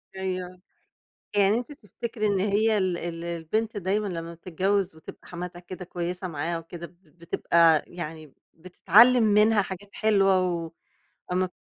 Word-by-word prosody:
أيوه، 185 -1 -4 0.7
يعني 205 +2 +4
أنتِ 245 +3 -5
تفتكري 225 - -4
إن 200 -2 +1
هي 210 +2 +2
ال 185 -3 0
ال 170 0 -5
البنت 170 +7 -2
دايمًا 200 +2 -1
لمّا 170 -2 -5
بتتجوز 185 +2 -1
وتبقى 160 - -13
حماتها 175 0 -7
كده 180 +1 -9
كويسة 180 +1 -4
معاها 165 +1 -3
وكده، 170 +1 -8
بتب 175 -1 -28
بتبقى 165 -1 +3
يعني 155 -4 -8 0.2
بتتعلّم 210 +8 +5
منها 210 0 +4
حاجات 195 +1 -7
حلوة، 195 -3 +3 0.9
وامّا 185 0 0
185 Hz, 135 wpm, -26 LUFS, 170-205 Hz, 0.9 s, بتتعلّم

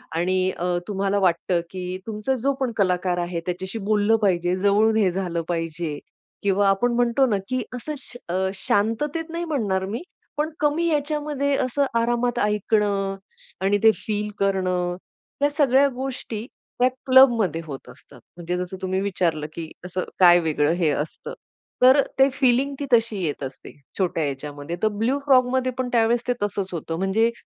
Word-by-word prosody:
आणि 185 +2 +1
अ, 175 - -3 0.2
तुम्हाला 200 0 0
वाटतं 180 -1 +1
की 185 0 -5
तुमचा 220 +4 -1
जो 275 - +2
पण 260 -3 0
कलाकार 180 -2 +1
आहे 175 -1 -2
त्याच्याशी 185 +4 -4
बोललं 210 +1 +3
पाहिजे, 180 -3 +2
जवळून 205 +3 +3
हे 200 -4 +3
झालं 175 -2 -2
पाहिजे 165 -2 -3 0.4
किंवा 200 0 +2
आपण 240 +5 +2
म्हणतो 245 +2 +3
ना, 205 - +2
की 255 0 0
असं 300 +5 -5
श 255 - -9 0.4
शांततेत 290 +11 0
नाही 335 +1 -3
म्हणणार 210 - -1
मी 215 +7 -4 0.4
पण 305 +1 0
कमी 305 +3 +1
याच्यामध्ये, 295 -2 0
असं 265 +2 +1
आरामात 240 +1 0
ऐकणं 205 -1 +1 0.5
आणि 200 +1 +3
ते 220 - +8
फील 210 -1 -3
करणं, 185 -2 0 0.5
या 290 - +5
सगळ्या 280 -2 +4
गोष्टी 250 -4 -5 0.3
त्या 250 +1 +5 0.2
क्लबमध्ये 235 - +5
होत 140 -4 -8
असतात. - - -16 0.2
म्हणजे 175 +1 -3
जसं 180 +1 -4
तुम्ही 190 0 -1
विचारलं, 175 -6 -1
की 165 -1 -7
असं 180 0 -3 0.2
काय 175 -1 +8
वेगळं 155 -2 +1
हे 170 -3 +1
असतं, 150 +2 -4 0.5
तर 260 +3 +7 0.2
ते 270 +1 +6
फिलिंग 265 +1 +2
ती 285 - -2
तशी 225 -4 +2
येत 150 -3 -3
असते. 130 0 -8 0.3
छोट्या 175 -3 0
ह्याच्यामध्ये, 145 +3 -5
तर 215 - +5
ब्लू 225 +6 0
फ्रॉगमध्ये 255 -1 +3
पण 255 -1 -2
त्यावेळेस 235 +1 +2
ते 245 - +2
तसंच 200 -1 -2
होतं 165 0 -4
म्हणजे 200 +5 +2
205 Hz, 160 wpm, -23 LUFS, 180-250 Hz, 0.5 s, ते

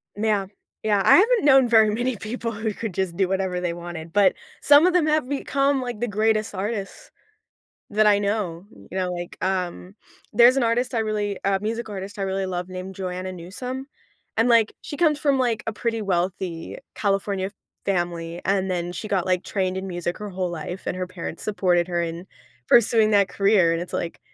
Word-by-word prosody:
Yeah. 210 -2 +1 0.4
Yeah, 210 -2 +2
I - - +8
haven't 450 +2 +4
known 270 -3 +6
very 220 -2 +6
many 245 0 -1
people 230 +2 -4
who 220 0 -3
could 220 -1 -5
just 185 -1 -2
do 190 0 +1
whatever 190 -2 -1
they 175 -1 -1
wanted, 170 -1 -7
but 200 +2 +4 0.3
some 290 +3 +7
of 365 - +4
them 355 -3 +3
have 305 -4 +1
become, 280 -1 +1
like, 245 -3 -5
the 240 - 0
greatest 215 +1 +1
artists 205 - -4 0.8
that 215 +1 +3
I 205 -1 +5
know, 200 -4 -2 0.3
you 185 - -7
know, 185 -1 -1
like, 175 0 -6
um, 185 0 -3 0.4
there's 240 +4 +6
an 270 - +2
artist 240 +2 +1
I 230 - +2
really 210 -2 -2
a 195 -1 +1
music 225 +2 -3
artist 200 +2 -7
I - - -2
really 195 0 -1
love 180 0 -4
named 185 +1 -6
Joanna 185 0 -4
Newsom, 250 +10 -6 0.5
and, 230 +2 +4
like, 230 -2 +4
she 290 - -7
comes 300 -1 +3
from, 280 -3 +2
like, 240 -4 0
a 225 - -2
pretty 230 +1 -2
wealthy 180 -3 -2 0.2
California 195 -1 -1 0.3
family, 175 -2 -2
and 190 -1 +1
then 175 -1 -2
she 215 - -6
got, 190 -4 0
like, 185 -1 +1
trained 185 -2 -1
in 190 0 -4
music 175 -1 -3
her 210 -1 -6
whole 185 -1 -2
life, 175 +2 -6
and - - -2
her 185 0 -3
parents 175 -2 -7
supported 180 -4 +1
her 175 -1 0
in 170 +2 -5 0.4
pursuing 225 -2 +5
that 200 -2 +4
career, 195 -3 +3
and 165 - -2
it's 175 - -8
like, 170 - -4
200 Hz, 195 wpm, -24 LUFS, 180-225 Hz, 0.8 s, I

